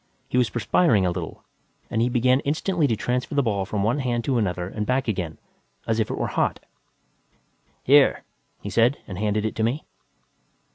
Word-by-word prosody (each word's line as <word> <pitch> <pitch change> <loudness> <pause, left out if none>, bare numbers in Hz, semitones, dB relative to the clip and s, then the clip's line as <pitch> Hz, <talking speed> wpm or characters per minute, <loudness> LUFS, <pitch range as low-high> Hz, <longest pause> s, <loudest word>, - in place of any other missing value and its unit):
He - - 0
was 120 -4 +2
perspiring 115 - +2
a 90 - +1
little 85 -2 -6 0.5
and 110 - +1
he 120 - +2
began 125 +1 +3
instantly 155 +3 0
to 115 - +1
transfer 125 +5 -2
the 140 - +3
ball 100 -5 0
from 100 -2 -1
one 115 +7 +1
hand 120 -3 -1
to 130 -2 +1
another 90 -4 -1
and 105 +2 -4
back 130 +4 0
again 90 -7 -2 0.5
as 115 0 0
if 110 - 0
it - - -3
were - - -1
hot. - - 0 1.2
"Here," 140 +1 +5 0.4
he - - -4
said, 120 +4 +3
and 95 -2 -7
handed 105 0 0
it 110 - -1
to 110 - 0
me. 125 +7 -1
115 Hz, 190 wpm, -24 LUFS, 105-130 Hz, 1.2 s, Here